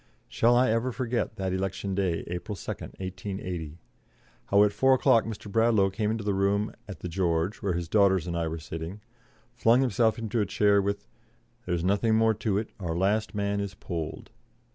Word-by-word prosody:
Shall 120 Hz, +1 st, +3 dB
I 125 Hz, -1 st, +4 dB
ever 115 Hz, +3 st, 0 dB
forget 120 Hz, -1 st, -2 dB
that 95 Hz, -1 st, -2 dB
election 95 Hz, +1 st, -2 dB
day, 95 Hz, -4 st, 0 dB
April 90 Hz, +4 st, -5 dB
2, -, -, -5 dB
1880? 95 Hz, -4 st, -6 dB, 0.7 s
How 100 Hz, +1 st, +5 dB
at 105 Hz, -1 st, +2 dB
four 130 Hz, +5 st, +4 dB
o'clock 115 Hz, -3 st, +4 dB
Mr. 110 Hz, -2 st, -6 dB
Bradlaugh 110 Hz, -3 st, +3 dB
came 105 Hz, +1 st, -1 dB
into 110 Hz, 0 st, -2 dB
the 100 Hz, 0 st, 0 dB
room 100 Hz, +2 st, +1 dB
at 100 Hz, -, -9 dB
the -, -, -4 dB
"George", 85 Hz, +1 st, 0 dB
where 100 Hz, -4 st, 0 dB
his 85 Hz, -1 st, -3 dB
daughters 95 Hz, -4 st, +3 dB
and 85 Hz, -1 st, -3 dB
I 85 Hz, -1 st, -1 dB
were 80 Hz, +1 st, -3 dB
sitting, 80 Hz, +5 st, -7 dB, 0.5 s
flung 120 Hz, +3 st, +4 dB
himself 115 Hz, -3 st, +2 dB
into 115 Hz, 0 st, -1 dB
a -, -, +1 dB
chair 100 Hz, +1 st, +3 dB
with, 100 Hz, -8 st, -3 dB, 0.6 s
"There's 85 Hz, -2 st, -1 dB
nothing 100 Hz, +4 st, +2 dB
more 110 Hz, 0 st, +4 dB
to 105 Hz, -1 st, -1 dB
do; -, -, -19 dB
our 85 Hz, -4 st, -3 dB
last 105 Hz, +4 st, +1 dB
man 100 Hz, 0 st, 0 dB
is 100 Hz, -1 st, -4 dB
polled." 80 Hz, -3 st, -6 dB
100 Hz, 185 wpm, -27 LUFS, 90-110 Hz, 0.7 s, How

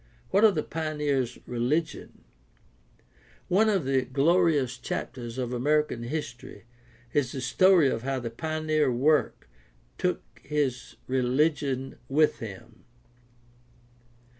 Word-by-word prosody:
What 200 Hz, -, +3 dB
of 215 Hz, -4 st, +6 dB
the 155 Hz, -, 0 dB
pioneer's 150 Hz, -5 st, -2 dB
religion? 130 Hz, +7 st, -2 dB, 1.3 s
One 215 Hz, +5 st, +4 dB
of 195 Hz, -8 st, +1 dB
the 135 Hz, -1 st, +2 dB
glorious 140 Hz, -1 st, +2 dB
chap -, -, -4 dB
ters 120 Hz, -1 st, -8 dB
of 125 Hz, -1 st, -3 dB
American 145 Hz, 0 st, +1 dB
history 120 Hz, -4 st, -6 dB, 0.5 s
is 135 Hz, -4 st, +1 dB
the 135 Hz, -, -4 dB
story 175 Hz, +4 st, +4 dB
of 115 Hz, -, -1 dB
how 135 Hz, +1 st, -2 dB
the 120 Hz, -2 st, -5 dB
pioneer 155 Hz, +1 st, 0 dB, 1.1 s
took -, -, 0 dB, 0.2 s
his 135 Hz, -4 st, -2 dB
religion 135 Hz, +1 st, 0 dB
with 150 Hz, +3 st, +3 dB
him. 100 Hz, -6 st, -10 dB
140 Hz, 110 wpm, -27 LUFS, 125-155 Hz, 1.3 s, of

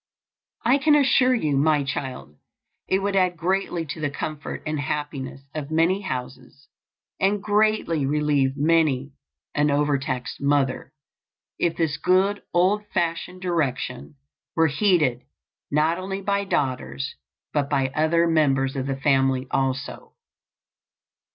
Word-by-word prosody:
I 255 Hz, +4 st, +4 dB
can 300 Hz, +1 st, +4 dB
assure 260 Hz, -3 st, +4 dB
you, 155 Hz, -, 0 dB
my 150 Hz, +1 st, +3 dB
child, 130 Hz, -, -5 dB, 0.5 s
it 190 Hz, +1 st, +1 dB
would 200 Hz, 0 st, 0 dB
add 180 Hz, -2 st, +2 dB
greatly 175 Hz, -1 st, -1 dB
to 155 Hz, +1 st, -6 dB
the 150 Hz, -, 0 dB
comfort 150 Hz, +1 st, -5 dB
and 155 Hz, -1 st, -2 dB
happiness 145 Hz, -2 st, -4 dB
of 150 Hz, -2 st, -5 dB
many 165 Hz, +5 st, +2 dB
houses, 130 Hz, -4 st, -7 dB, 0.5 s
and 200 Hz, +2 st, +2 dB
greatly 210 Hz, -8 st, +1 dB
relieve 145 Hz, -2 st, +1 dB
many 150 Hz, -3 st, +2 dB, 0.4 s
an 150 Hz, 0 st, +2 dB
overtaxed 140 Hz, -3 st, -1 dB
mother, 140 Hz, -1 st, 0 dB, 0.7 s
if 170 Hz, -1 st, 0 dB
this 160 Hz, -3 st, 0 dB
good 190 Hz, +3 st, +2 dB
old 195 Hz, +4 st, +2 dB
fashioned 180 Hz, 0 st, -2 dB
direction 145 Hz, -6 st, -2 dB, 0.4 s
were 165 Hz, -, +4 dB
heeded 150 Hz, -, +2 dB, 0.5 s
not 155 Hz, +4 st, +1 dB
only 195 Hz, +1 st, -4 dB
by 200 Hz, 0 st, 0 dB
daughters 125 Hz, -, -2 dB, 0.4 s
but 145 Hz, -2 st, 0 dB
by 135 Hz, -2 st, +1 dB
other 160 Hz, +4 st, +2 dB
members 135 Hz, -5 st, +2 dB
of 135 Hz, 0 st, -2 dB
the 135 Hz, -1 st, -2 dB
family 135 Hz, -2 st, +2 dB
also. 135 Hz, 0 st, -2 dB
150 Hz, 125 wpm, -24 LUFS, 135-185 Hz, 0.7 s, I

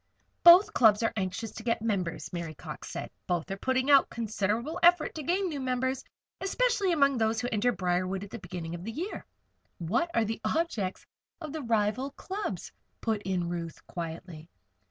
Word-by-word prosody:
"Both 345 Hz, +4 st, +9 dB
clubs 220 Hz, -2 st, +5 dB
are 225 Hz, -, +1 dB
anxious 200 Hz, +2 st, -3 dB
to -, -, -8 dB
get 230 Hz, -1 st, 0 dB
members," 180 Hz, -8 st, -2 dB
Mary 170 Hz, -3 st, -4 dB
Cox -, -, -8 dB
said. -, -, -6 dB, 0.2 s
"Both 175 Hz, +1 st, -1 dB
are 195 Hz, -, -3 dB
putting 260 Hz, +5 st, +1 dB
out 275 Hz, -1 st, +6 dB
considerable 230 Hz, -, -2 dB
effort 345 Hz, -2 st, +5 dB
to 315 Hz, -, -5 dB
gain 365 Hz, +6 st, 0 dB
new 300 Hz, -5 st, -3 dB
members 260 Hz, 0 st, -1 dB, 0.4 s
especially 410 Hz, -1 st, +1 dB
among 280 Hz, -5 st, +3 dB
these 220 Hz, 0 st, +1 dB
who 245 Hz, -, -1 dB
enter 225 Hz, +3 st, +2 dB
Briarwood 185 Hz, 0 st, -1 dB
at 205 Hz, -, -10 dB
the -, -, -6 dB
beginning 170 Hz, -2 st, -6 dB
of 175 Hz, 0 st, -6 dB
the 225 Hz, -, -4 dB
year." 345 Hz, -, -5 dB, 0.5 s
"What 210 Hz, -, 0 dB
are 230 Hz, -1 st, +3 dB
the 225 Hz, +1 st, -4 dB
objects 225 Hz, -, -1 dB, 0.3 s
of 310 Hz, -4 st, -7 dB
the 315 Hz, -, -3 dB
rival 230 Hz, +2 st, +1 dB
clubs?" 390 Hz, +7 st, -5 dB, 0.3 s
put 220 Hz, -3 st, -1 dB
in 185 Hz, -3 st, -1 dB
Ruth, 170 Hz, -2 st, -5 dB
quietly. 165 Hz, -1 st, -7 dB
225 Hz, 175 wpm, -29 LUFS, 185-285 Hz, 0.5 s, Both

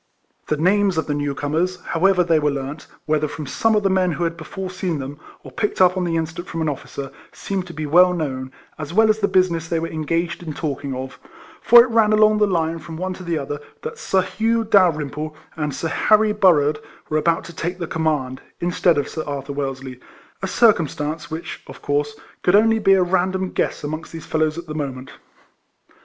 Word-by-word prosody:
The 150 Hz, -, 0 dB
names 190 Hz, +3 st, +2 dB
of 160 Hz, -, 0 dB
the 150 Hz, -, -2 dB
new 145 Hz, -1 st, -2 dB
comers, 165 Hz, +6 st, -1 dB
however 180 Hz, +2 st, +2 dB
they 165 Hz, -2 st, +3 dB
were 150 Hz, 0 st, +1 dB
learnt, 140 Hz, +2 st, -5 dB, 0.2 s
whether 155 Hz, 0 st, +1 dB
from 150 Hz, +1 st, -7 dB
some 225 Hz, +10 st, +1 dB
of 210 Hz, -, +2 dB
the 195 Hz, -, +3 dB
men 185 Hz, -2 st, +2 dB
who 175 Hz, -, -2 dB
had 165 Hz, 0 st, -1 dB
before 185 Hz, +3 st, -6 dB
seen 180 Hz, -3 st, -2 dB
them, 140 Hz, +1 st, -6 dB, 0.2 s
or -, -, -11 dB
picked 210 Hz, -, -2 dB
up 180 Hz, 0 st, +5 dB
on 185 Hz, -1 st, -1 dB
the 165 Hz, -1 st, -1 dB
instant 165 Hz, +2 st, -3 dB
from 165 Hz, 0 st, -3 dB
an 155 Hz, -, 0 dB
officer, 135 Hz, -1 st, -6 dB, 0.2 s
seemed 190 Hz, -2 st, -4 dB
to 170 Hz, -, -9 dB
be 155 Hz, 0 st, -3 dB
well 180 Hz, +5 st, +5 dB
known, 130 Hz, -6 st, -3 dB, 0.3 s
as 155 Hz, +2 st, -6 dB
well 220 Hz, 0 st, +6 dB
as 215 Hz, -, -2 dB
the 200 Hz, -, +2 dB
business 185 Hz, -4 st, +1 dB
they 165 Hz, -, -1 dB
were 165 Hz, +1 st, -2 dB
engaged 165 Hz, +3 st, -2 dB
in 160 Hz, -3 st, -6 dB
talking 140 Hz, -3 st, -3 dB
of; 130 Hz, +1 st, -7 dB, 0.4 s
for 235 Hz, +1 st, +8 dB
it 240 Hz, -, -4 dB
ran 220 Hz, -2 st, +4 dB
along 215 Hz, 0 st, +5 dB
the 210 Hz, -, +4 dB
line 165 Hz, -3 st, 0 dB
from 160 Hz, 0 st, -9 dB
one 185 Hz, +2 st, -3 dB
to 185 Hz, -, -11 dB
the 170 Hz, -2 st, -1 dB
other 145 Hz, 0 st, -4 dB, 0.2 s
that 460 Hz, 0 st, -6 dB
Sir 190 Hz, -1 st, +1 dB
Hugh 225 Hz, +3 st, 0 dB
Dalrymple 155 Hz, -7 st, +1 dB, 0.2 s
and 150 Hz, -2 st, -2 dB
Sir 165 Hz, +4 st, -3 dB
Harry 215 Hz, +5 st, +3 dB
Burrard 155 Hz, -8 st, +3 dB, 0.3 s
were 155 Hz, -, +1 dB
about 165 Hz, +1 st, +1 dB
to 170 Hz, -, -11 dB
take 175 Hz, +2 st, -3 dB
the 175 Hz, -, -3 dB
command, 150 Hz, -6 st, -1 dB, 0.2 s
instead 175 Hz, -1 st, +2 dB
of 145 Hz, -, 0 dB
Sir 155 Hz, -, -5 dB
Arthur 140 Hz, -1 st, -4 dB
Wellesley, 135 Hz, -2 st, -5 dB, 0.4 s
a 190 Hz, -, -2 dB
circumstance 165 Hz, -8 st, +1 dB
which, 160 Hz, +1 st, -6 dB
of -, -, -12 dB
course, 145 Hz, +1 st, -1 dB, 0.3 s
could 180 Hz, -, +3 dB
only 225 Hz, +1 st, +4 dB
be 195 Hz, -2 st, +4 dB
a 190 Hz, -1 st, +4 dB
random 185 Hz, +1 st, 0 dB
guess -, -, -2 dB
amongst 155 Hz, +3 st, -5 dB
these 165 Hz, -, -8 dB
fellows 155 Hz, 0 st, 0 dB
at 170 Hz, -, -6 dB
the 155 Hz, -, -6 dB
mo 145 Hz, -3 st, -2 dB
ment. 130 Hz, +1 st, -10 dB
165 Hz, 215 wpm, -21 LUFS, 150-185 Hz, 0.4 s, for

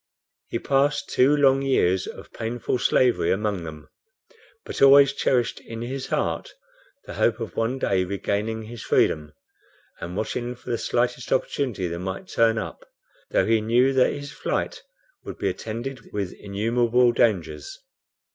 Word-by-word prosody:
He -, -, -2 dB
passed 140 Hz, +4 st, +1 dB
two 140 Hz, +4 st, +4 dB
long 135 Hz, -1 st, +4 dB
years 95 Hz, -9 st, +2 dB
of -, -, -10 dB
painful 120 Hz, +2 st, -2 dB
slavery 125 Hz, 0 st, +3 dB
among 100 Hz, -3 st, -1 dB
them, 75 Hz, -2 st, -9 dB, 0.8 s
but -, -, -6 dB
always 140 Hz, 0 st, +7 dB
cherished 125 Hz, -3 st, 0 dB
in 115 Hz, 0 st, -7 dB
his 130 Hz, +2 st, -4 dB
heart -, -, -2 dB, 0.5 s
the -, -, -8 dB
hope 115 Hz, 0 st, +1 dB
of 115 Hz, -3 st, -6 dB
one 115 Hz, +4 st, 0 dB
day 95 Hz, -7 st, +1 dB
regaining 105 Hz, +4 st, -2 dB
his 115 Hz, 0 st, -9 dB
freedom, 75 Hz, -1 st, +1 dB, 0.7 s
and 90 Hz, +3 st, -6 dB
watching 120 Hz, +3 st, -3 dB
for 120 Hz, -, -8 dB
the 115 Hz, -, -1 dB
slightest 125 Hz, +1 st, -1 dB
opportunity 130 Hz, -7 st, 0 dB
that 85 Hz, 0 st, -4 dB
might 95 Hz, +1 st, -5 dB
turn 115 Hz, -1 st, +3 dB
up, -, -, -5 dB, 0.5 s
though -, -, +2 dB
he 110 Hz, -1 st, +3 dB
knew 120 Hz, +5 st, +3 dB
that 130 Hz, -1 st, +4 dB
his 145 Hz, 0 st, -7 dB
flight -, -, -3 dB, 0.4 s
would -, -, -8 dB
be -, -, 0 dB
attended 120 Hz, +2 st, -6 dB
with 100 Hz, -3 st, -3 dB
innumerable 120 Hz, +4 st, +1 dB
dangers. 115 Hz, -, 0 dB
115 Hz, 150 wpm, -24 LUFS, 105-130 Hz, 0.8 s, always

